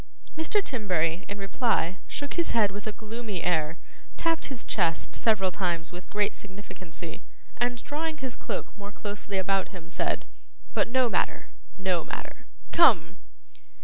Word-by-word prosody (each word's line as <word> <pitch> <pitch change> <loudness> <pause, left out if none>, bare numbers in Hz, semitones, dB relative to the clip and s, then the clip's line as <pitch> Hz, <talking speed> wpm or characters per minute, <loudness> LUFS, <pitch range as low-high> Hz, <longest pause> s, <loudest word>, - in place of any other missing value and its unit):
Mr. 325 +6 +2
Timberry, 180 - +1
in 205 - -4
reply, 195 -3 +1
shook 285 0 -3
his 340 -8 +1
head 210 -3 +5
with 205 +2 -6
a - - 0
gloomy 215 -2 -4
air, 160 -2 +2 0.4
tapped 330 -1 +1
his 265 -4 -4
chest 165 -1 +1
several 195 -5 +3
times 175 -4 0
with 180 +1 -8
great 210 0 +2
significancy, 190 -4 -8 0.4
and 245 0 0
drawing 310 +2 -2
his 260 -3 -4
cloak - - -4
more 205 0 -7
closely 205 -1 -4
about 195 0 +2
him, 180 -4 -10
said, - - 0 0.5
'But - - +3
no 255 +1 +4
matter, - - 0 0.3
no 185 -4 +1
matter. - - -6 0.2
Come! - - +6
205 Hz, 145 wpm, -29 LUFS, 185-240 Hz, 0.5 s, Come